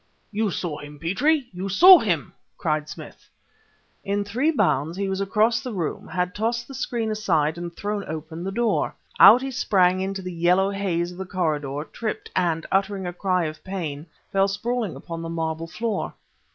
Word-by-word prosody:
"You 215 0 0
saw 170 -4 -3
him, 145 0 -10
Petrie! 250 - +1
you 185 +2 -4
saw 360 - +9
him!" 175 -9 -1 0.2
cried 155 -2 -1
Smith. - - -11 0.7
In 200 +1 -1
three 240 +10 0
bounds 175 - +1
he 200 0 -1
was 190 0 -2
across 215 +4 +2
the 250 -3 -5
room, 170 -5 -3
had 180 -1 -2
tossed 235 +2 -1
the 275 - -10
screen 235 -4 -2
aside 165 -8 +1
and 175 0 -6
thrown 205 0 -3
open 160 +2 -6
the 195 - -3
door. 235 +3 0 0.2
Out 255 - +9
he 270 - -3
sprang 185 -6 +2
into 190 0 -3
the 180 0 -5
yellow 180 +3 +3
haze 180 -3 -1
of 180 - -11
the 190 - -4
corridor, 150 -5 -2
tripped, 220 -2 -4
and, 165 -3 +1
uttering 195 0 0
a 175 - -4
cry 180 -1 0
of 155 0 -6
pain, 165 -5 -5 0.2
fell 195 -1 +3
sprawling 220 +1 -2
upon 165 -1 -7
the 165 - -5
marble 165 0 -3
floor. 220 +4 -3
190 Hz, 180 wpm, -24 LUFS, 165-210 Hz, 0.7 s, saw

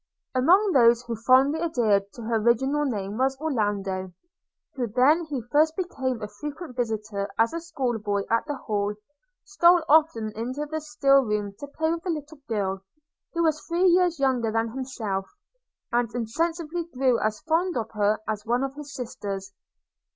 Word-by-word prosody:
Among 365 +11 +4
those 235 -4 +5
who 235 -1 -4
fondly 260 +7 +4
adhered 215 -11 +1
to 235 - -9
her 225 0 0
original 265 +6 +2
name 210 -4 -3
was 265 +1 +1
Orlando; 205 -10 -1 0.6
who, 250 -3 -2
when 270 +9 +3
he 280 -6 -4
first 310 +2 +3
became 260 - -3
a - - -3
frequent 290 - -8
visitor 215 -4 -2
as 225 +4 +3
a 335 - -2
schoolboy 240 -11 -2
at 230 +5 +1
the 290 - -2
Hall, 210 -4 -2 0.5
stole 350 -3 +4
often 295 -8 +3
into 255 +7 -3
the 315 +1 -4
still 280 -3 +3
room 210 -3 -2
to 285 - -7
play 315 +3 -1
with 335 - -4
the 360 - -5
little 305 -2 -5
girl, 195 -3 -1 0.5
who 335 0 +1
was 310 -2 +1
three 345 +2 +1
years 355 -1 +4
younger 255 -5 +1
than 225 +1 0
himself 220 -7 -4 0.3
– - - -63
and 240 -1 +1
insensibly 325 +8 -2
grew 260 -6 +1
as 215 0 -1
fond 330 +2 0
of 225 -1 -3
her 210 0 +1
as 215 -1 -2
one 240 +3 0
of 270 0 -3
his 290 -1 -9
sisters. 200 -5 -5
255 Hz, 170 wpm, -25 LUFS, 215-310 Hz, 0.6 s, those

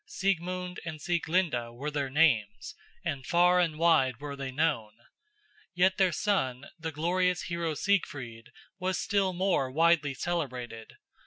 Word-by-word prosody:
Siegmund 180 -1 -2
and 155 -2 -6
Sieglinde 160 -7 0
were 145 +5 -4
their 140 -2 -2
names, 130 -9 +2 0.3
and 135 -2 -2
far 180 +1 +4
and 165 -3 +1
wide 135 -7 +3
were 145 -1 -6
they 135 -1 -5
known. 130 -6 0 0.8
Yet 185 +2 +3
their 190 -2 +3
son, 155 -9 -1
the 160 0 -4
glorious 180 +4 0
hero 170 -2 -2
Siegfried, 135 - -2 0.3
was 185 0 -1
still 195 -2 +1
more 180 -7 +1
widely 155 -1 +3
celebrated. 125 -8 -4
160 Hz, 135 wpm, -29 LUFS, 135-180 Hz, 0.8 s, far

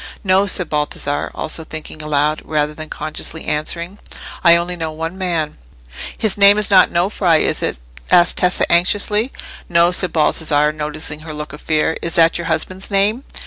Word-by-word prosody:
"No," 195 0 +3
said 180 -3 -2
Baldassarre, 150 -1 -2
also 160 +1 -3
thinking 155 0 -7
aloud, 150 0 0
rather 150 -1 -1
than 155 0 -9
consciously 155 +1 -5
answering, 170 +6 -3 0.4
"I 170 0 +7
only 175 +1 -2
know 160 -2 -4
one 165 +3 -5
man." 170 -5 -3 0.6
"His 210 -2 +1
name 200 +1 +7
is 210 -1 +2
not 185 -2 +6
Nofri, 175 -2 +1
is - - 0
it?" - - -2 0.3
said 175 0 +4
Tessa, 180 0 +2
anxiously. 205 +7 +2 0.4
"No," 170 0 +3
said 180 -1 -1
Baldassarre, 150 -1 +2
noticing 150 0 -3
her 155 0 -8
look 150 -1 -7
of 150 - -10
fear. 155 +1 0
"Is 170 - -3
that 165 0 +4
your 170 - -5
husband's 185 +4 -1
name?" 205 +5 +1
165 Hz, 170 wpm, -18 LUFS, 155-185 Hz, 0.6 s, I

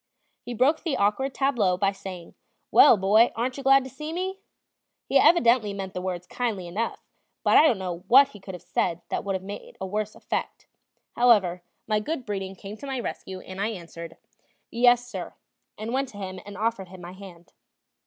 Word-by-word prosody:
He 245 - -6
broke 275 +7 +3
the 320 -7 -1
awkward 210 +7 +1
tableau 240 -10 +1
by 195 +1 +2
saying: 185 -3 -9 0.4
"Well, 260 - +8
boy, 210 +5 +4
aren't 250 +3 -2
you - - -5
glad 270 0 +5
to 260 - -8
see 300 +4 -6
me?" 375 +3 -3 0.7
He - - +4
evidently 235 - +4
meant 195 -1 -5
the 180 - -4
words 180 -1 -4
kindly 215 -4 -3
enough, 205 +7 -4 0.4
but - - +4
I 315 - +8
don't 240 - +2
know 180 -3 -4
what 275 +4 +7
he 210 - -13
could 190 -1 -8
have 175 - -12
said 170 -1 -1
that - - -2
would 195 -1 -2
have 190 - -13
had 205 0 -9
a 190 - -3
worse 210 +2 -3
effect; - - -4 0.5
however, 205 -8 +4 0.2
my 215 -1 +1
good 260 +4 -4
breeding 195 -3 -4
came 200 +3 -9
to 280 - -9
my 265 -2 -3
rescue, 190 -5 -6
and 190 +1 -7
I 205 - +1
answered: 170 -5 -8 0.5
"Yes, 245 +1 +4
sir," 190 -7 -7 0.4
and 220 +3 -5
went 270 0 0
to 205 - -13
him 190 -2 -6
and 205 -1 -9
offered 215 -3 -1
him 185 0 -12
my 175 0 -8
hand. 185 -3 -13
210 Hz, 200 wpm, -26 LUFS, 190-245 Hz, 0.7 s, Well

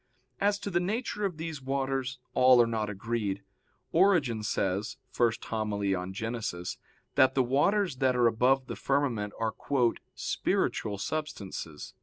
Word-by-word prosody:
As 200 0 +2
to 200 - -4
the 175 - +2
nature 210 +2 -2
of 180 -5 -2
these 160 -3 -5
waters, 135 0 -1 0.2
all 130 -1 +6
are 120 - +7
not 110 -2 -1
agreed. 105 -1 -2 0.5
Origen 165 - +3
says 100 0 -1 0.2
(Hom. 110 -2 0
i - - -2
in 95 -2 -1
Gen.) 115 +4 -3 0.7
that 130 -1 +4
the 130 - +4
waters 145 +6 +2
that 130 -1 +2
are 120 -1 +3
above 125 +4 +3
the - - -5
firmament 130 -7 0
are 115 -1 0 0.6
"spiritual 105 -1 -1
substances." 100 - -5
125 Hz, 140 wpm, -29 LUFS, 110-145 Hz, 0.7 s, are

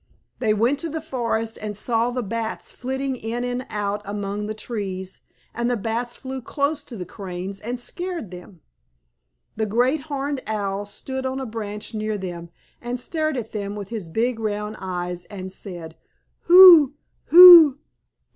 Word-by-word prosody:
They 225 -4 +1
went 240 +7 +1
to 330 - -3
the 320 +1 -4
forest, 230 -7 -3
and 210 -2 -5
saw 230 +2 0
the 245 0 -3
Bats 225 +2 -5
flitting 265 +1 -3
in 235 +1 -4
and 245 +1 -4
out 205 0 -2
among 205 0 -4
the 215 - -4
trees, 195 -5 -6 0.3
and 235 +1 -1
the 245 - 0
Bats 235 +3 -3
flew 265 0 -7
close 285 +4 -2
to 235 - -9
the 180 - -6
Cranes 190 +1 -7
and 240 +4 -5
scared 345 - -5
them. 180 -1 -12 1.0
The 220 -1 -1
Great 250 +8 +1
Horned 280 -1 -3
Owl 205 -2 -3
stood 265 +6 -6
on 260 +1 -3
a 265 - -4
branch 215 -2 -6
near 215 0 -2
them, 175 -3 -7 0.3
and 240 +1 -4
stared 310 +2 -2
at 225 -2 -5
them 205 -1 -4
with 200 -2 -7
his 210 -8 -6
big 230 +6 -1
round 210 0 -3
eyes, 180 -1 -5
and 190 -2 -8
said, 175 -4 -9 0.5
"Who? 340 -6 +9 0.3
Who? 340 -5 +10
225 Hz, 165 wpm, -23 LUFS, 200-260 Hz, 1.0 s, Who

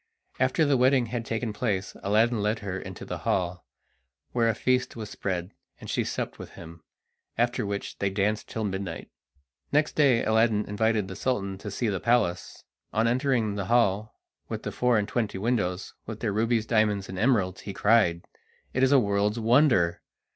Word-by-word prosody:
After 130 +5 +3
the 140 -2 +3
wedding 130 0 +4
had 120 -1 -2
taken 115 -1 -2
place 105 -4 -2
Aladdin 110 +3 +2
led 105 +2 +1
her 95 -1 -3
into 95 -3 -8
the - - -5
hall, 90 -2 -1 0.6
where 115 -2 +2
a 110 - 0
feast 125 +2 0
was 110 -3 -7
spread, 90 -1 -3 0.3
and - - -7
she - - +1
supped - - -4
with - - -9
him, 85 0 -11 0.6
after 120 -2 0
which 100 0 -5
they 100 - +1
danced 105 +2 -1
till 110 - -3
midnight. 95 -4 -4 0.6
Next 150 +1 +2
day 135 -6 +4
Aladdin 110 -1 +3
invited 105 0 0
the 95 - -7
Sultan 100 -6 -1
to 105 - -6
see 115 +4 -2
the 100 -3 -1
palace. 105 -8 0 0.3
On 110 +2 +2
entering 125 -3 +1
the 100 -1 -3
hall 110 -1 +1 0.3
with - - -4
the - - -3
four 125 -2 +2
and 105 -1 0
twenty 110 -4 -2
windows, 95 -4 -1
with 110 -1 -6
their 110 -3 -1
rubies, 115 +1 +1
diamonds, 105 -3 +1
and 95 0 -6
emeralds, 105 -6 +1
he 100 - -6
cried: 95 -4 +3 0.5
"It 130 - 0
is 130 0 +4
a 140 - +7
world's 105 0 +1
wonder! 115 - +3
110 Hz, 180 wpm, -27 LUFS, 100-120 Hz, 0.6 s, a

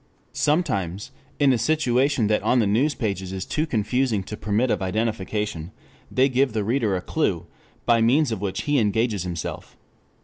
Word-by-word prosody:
Sometimes 105 - -1 0.3
in 140 -2 +4
a 120 - 0
situation 135 -2 +2
that 105 0 +1
on 125 - +2
the 115 - +3
news 125 +9 +2
pages 100 -5 -3
is 95 -1 -4
too 155 +1 -1
confusing 115 -2 0
to 105 - -7
permit 110 +4 0
of 100 - 0
identification, 105 -3 -2 0.4
they 130 +1 +3
give 130 -2 +1
the 110 -2 0
reader 110 -2 +1
a 90 - -2
clue 90 - -1 0.4
by 115 -1 +4
means 130 +4 +3
of 110 -4 -3
which 100 -2 -3
he 145 -2 +2
engages 110 -1 +1
himself. 85 -3 -6
110 Hz, 170 wpm, -24 LUFS, 100-130 Hz, 0.4 s, in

